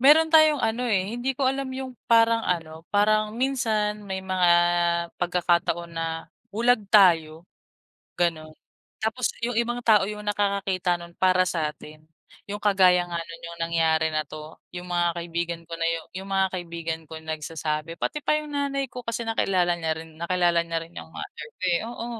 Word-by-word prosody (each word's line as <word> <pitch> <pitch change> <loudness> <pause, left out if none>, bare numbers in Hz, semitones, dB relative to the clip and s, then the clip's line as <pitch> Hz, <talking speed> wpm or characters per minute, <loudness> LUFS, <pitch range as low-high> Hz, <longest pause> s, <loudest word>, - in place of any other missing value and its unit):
meron 310 +4 +6
tayong 310 -3 +6
ano, 235 +3 0
eh. 200 -1 0
Hindi 265 +2 -1
ko 275 - 0
alam 270 0 -3
yung 260 -1 -5 0.2
parang 230 0 +5
ano, 165 -2 -3
parang 215 +1 +2
minsan 225 -5 0
may 190 -1 -4
mga 185 -1 +2 0.7
pagkakataon 175 -1 +1
na 165 0 -2 0.5
bulag 235 +1 +3
tayo, 165 -5 +4 0.7
gano'n. 160 -3 -1 0.5
Tapos 220 +3 0
yung 245 -1 -2
ibang 240 +1 0
tao 215 -4 +5
yung 210 0 -6
nakakakita 200 -3 0
nun 170 0 -11
para 185 0 +4
sa 155 -3 -1
'tin. 155 0 -13 0.4
Yung 205 +1 -5
kagaya 185 -3 +5
nga 170 - -3
noon, 165 0 -9
yung 170 - -11
nangyari 160 -1 +2
na 155 0 0
'to. 155 0 -9 0.2
'Yung 175 - -6
mga 175 -1 +1
kaibigan 170 0 -3
ko 170 - -15
na 165 0 -1
yung 165 -1 -3
yung 195 - -10
mga 195 0 +3
kaibigan 170 -2 -4
ko 160 - -8
nagsasabi. 155 0 -4
Pati 300 - -2
pa 305 - +3
yung 300 -1 -9
nanay 275 -1 -1
ko 250 - -6
kasi 230 +1 -3
nakilala 190 -5 +1
niya 160 -1 -1
rin. 160 -1 -11
Nakilala 175 0 +2
niya 165 0 -2
rin 165 - -18
yung - - -13
mother 150 - -8
ko - - -56
eh. 170 -1 +2
Oo. 235 0 -6
180 Hz, 175 wpm, -25 LUFS, 165-225 Hz, 0.7 s, meron